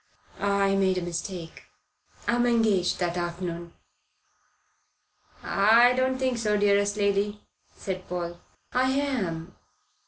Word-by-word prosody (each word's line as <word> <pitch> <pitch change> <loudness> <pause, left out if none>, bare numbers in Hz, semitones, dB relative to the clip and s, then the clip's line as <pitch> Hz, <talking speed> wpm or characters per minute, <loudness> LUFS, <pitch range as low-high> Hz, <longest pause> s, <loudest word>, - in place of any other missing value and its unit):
I 200 -1 +2
made 190 -1 +2
a - - -1
mistake. 175 0 -6 0.6
I'm 240 +1 +2
engaged 220 -6 +2
that 175 -1 -1
afternoon." 175 -1 -4 1.7
"I 230 +5 +5
don't 260 +1 +1
think 255 -2 -1
so, 210 -2 +1
dearest 205 0 +2
lady," 205 0 0 0.3
said 185 -1 -5
Paul. 175 -1 -4 0.3
"I 255 +1 +2
am." 220 -12 -2
200 Hz, 105 wpm, -26 LUFS, 180-230 Hz, 1.7 s, I